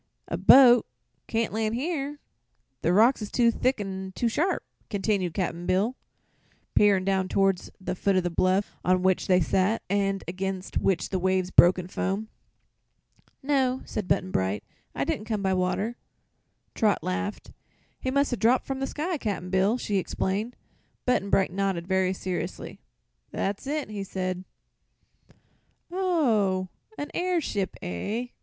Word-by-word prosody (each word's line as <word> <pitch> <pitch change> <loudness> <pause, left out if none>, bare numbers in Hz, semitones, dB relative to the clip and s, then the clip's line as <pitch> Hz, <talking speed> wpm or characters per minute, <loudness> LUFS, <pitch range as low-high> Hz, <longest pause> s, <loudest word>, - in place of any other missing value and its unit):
"A - - -2
boat 250 -3 +7 0.4
can't 225 -2 -1
land 220 0 0
here; 290 +1 -2 0.6
the 170 - +2
rocks 225 +7 +4
is 210 - -4
too 235 -2 +4
thick 255 +2 0
an' 190 -1 -5
too 240 - 0
sharp," 320 - 0 0.3
continued 195 -4 -1
Cap'n 175 -2 -2
Bill, 205 +7 +1 0.8
peering 200 -3 +4
down 190 -1 +1
toward 195 -1 +2 0.2
the 185 - -3
foot 195 +1 +1
of 185 - +2
the 175 - -1
bluff 185 +4 +1
on 185 0 +2
which 185 -1 +2
they 185 -2 +5
sat 185 +5 +1
and 195 -1 0
against 190 +1 -3
which 190 -3 0
the 190 - -1
waves 185 0 0
broke 175 +2 +7
in 180 -1 -5
foam. 195 +3 -2 1.1
"No," 265 -2 +1
said 210 -4 -4
Button 185 0 0
Bright; 95 - -1 0.3
"I - - 0
didn't 210 - -2
come 215 -3 -2
by 190 0 +2
water." 190 +6 -1 0.8
Trot 210 -7 +1
laughed. 205 +3 -3 0.5
"He 260 - -2
must 280 0 +1
'a' - - -1
dropped 240 +4 +3
from 270 -1 -3
the 270 - -1
sky, 320 +3 -3
Cap'n 195 -6 -3
Bill!" 195 +5 +3
she 205 -5 -1
exclaimed. 200 +5 -2 0.5
Button 250 -6 +1
Bright 190 -3 +2
nodded, 195 -3 -1
very 190 -1 +2
seriously. 185 -1 -5 0.5
"That's 200 +6 -3
it," 300 0 -2
he 205 -2 -4
said. 185 -1 -4 1.5
"Oh; 230 - +1 0.3
a 290 - -4
airship, 335 - -1
eh?" 210 - -3
200 Hz, 150 wpm, -27 LUFS, 185-240 Hz, 1.5 s, boat